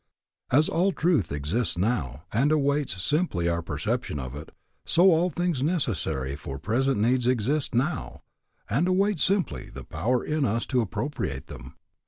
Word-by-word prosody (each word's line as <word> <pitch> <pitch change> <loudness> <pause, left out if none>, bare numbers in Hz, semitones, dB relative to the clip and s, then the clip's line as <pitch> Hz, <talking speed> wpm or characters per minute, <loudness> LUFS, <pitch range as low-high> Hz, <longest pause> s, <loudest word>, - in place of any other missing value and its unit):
As 150 +5 +5
all 185 +4 +2
truth 160 - +1
exists 80 +11 0
now, 80 - -1
and 135 +7 +3
awaits 145 -7 +1
simply 145 - 0
our 85 0 0
perception 85 - -2
of 65 -1 -5
it, 75 +2 -9 0.3
so 180 +3 +5
all 170 +2 +3
things 175 -4 -1
necessary 90 - -1
for 70 -2 -7
present 120 - 0
needs 120 +3 +2
exist 130 +3 +1
now, 135 +5 -1 0.4
and 140 - +1
await 195 0 +2
simply 195 +2 0
the - - -9
power 125 +2 -1
in 155 -1 0
us 115 -1 0
to 125 -3 +1
appropriate 110 - -3
them. - - -11
125 Hz, 155 wpm, -26 LUFS, -, 0.4 s, As